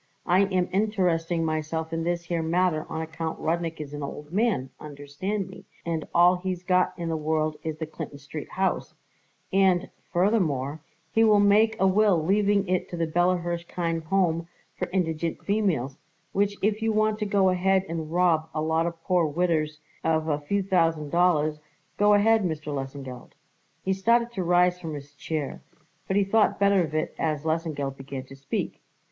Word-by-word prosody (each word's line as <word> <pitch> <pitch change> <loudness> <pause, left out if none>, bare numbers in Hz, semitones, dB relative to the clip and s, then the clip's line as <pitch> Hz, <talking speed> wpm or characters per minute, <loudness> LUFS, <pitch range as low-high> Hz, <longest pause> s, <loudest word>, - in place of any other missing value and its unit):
I 185 +3 +4
am 185 -2 0
interesting 180 -5 +1
myself 160 +1 -2
in 165 - -1
this 170 0 -1
here 170 -1 -2
matter 165 -1 +1
on 160 - -3
account 160 0 -4
Rudnik 165 0 -1
is 150 -1 -7
an 145 - -5
old 150 +2 -7
man, 200 - +1
understand 150 +8 -4
me, 190 0 -12 0.2
and 165 -2 -2
all 175 +1 +5
he's 180 -1 -4
got 185 0 +2
in 170 -1 -4
the 165 - -1
world 155 0 0
is 160 -1 -3
the 160 - -3
Clinton 155 -2 -7
Street 145 +2 -8
house; 190 0 -1 0.6
and, 190 -1 +3 0.2
furthermore, 160 - +1 0.3
he 225 - +4
will 215 -2 +5
make 215 +2 +4
a 190 - +4
will 200 0 +4
leaving 200 +1 +2
it 185 0 0
to 175 - -5
the 165 - +1
Bella 175 +3 +2
Hirshkind 170 -1 -3
Home 170 -2 +1 0.3
for - - -3
Indignant 165 -3 -2
Females, 175 - 0 0.3
which 205 +1 +1
if 210 +1 +1
you 225 0 +1
want 215 0 +1
to 210 - -1
go 195 -2 +3
ahead 190 +1 +2
and 160 -1 -4
rob 170 -3 +2
a 155 - 0
lot 160 +1 +1
of 165 -1 -7
poor 180 -3 +2
old 145 - -7
widders 155 -3 0 0.2
of 160 -1 +1
a 150 -2 0
few 200 +7 -1
thousand 165 -5 +1
dollars, 155 -4 +2 0.4
go 205 0 +6
ahead, 220 +1 +4
Mr. 155 -4 -3
Lesengeld." 135 -2 -6 0.5
He 190 - +1
started 235 +5 +2
to 205 -5 -3
rise 180 +1 +3
from 160 -3 -5
his 145 0 -10
chair, 150 0 -4 0.5
but 190 - +1
he 205 - +4
thought 210 +2 +2
better 200 -2 +4
of 155 -1 -5
it 155 - -1
as 155 -2 -1
Lesengeld 155 -4 -2
began 135 -1 -6
to 135 +1 -13
speak. 135 0 -4
170 Hz, 180 wpm, -26 LUFS, 155-190 Hz, 0.6 s, go